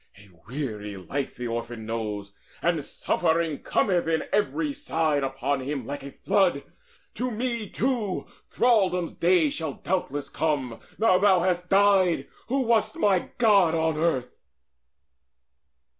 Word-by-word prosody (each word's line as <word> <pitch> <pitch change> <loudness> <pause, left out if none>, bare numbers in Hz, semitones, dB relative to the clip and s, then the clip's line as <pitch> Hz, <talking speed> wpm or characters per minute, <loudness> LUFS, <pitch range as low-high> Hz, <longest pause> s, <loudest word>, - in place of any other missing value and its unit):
A 100 0 -17 0.2
weary 110 -6 -5
life 135 +9 -4
The 125 - -6
orphan 115 -1 -4
knows, 105 -3 -4 0.3
and 165 -3 +1
suffering 165 -2 0
cometh 180 -5 +1
in 160 -1 +1
From - - -9
every 285 +9 0
side 160 - 0
upon 135 +1 -1
him 135 -1 -4
like 145 +3 -5
a 140 - -8
flood. 190 -6 +1 0.5
To 255 - -2
me 235 -2 -2
too 230 -7 -1 0.2
thraldom's 195 -8 +2
day 170 -4 +3
shall 160 -2 -3
doubtless 145 -6 -2
come, 140 -7 -1 0.2
Now 200 -5 +4
thou 190 -3 +4
hast 180 0 0
died, 195 -7 +4 0.2
who 270 +3 +1
wast 230 +3 +1
my 200 - +2
god 200 -8 +4
on 160 -1 +1
earth." 155 -6 0
165 Hz, 135 wpm, -26 LUFS, 135-200 Hz, 0.5 s, Now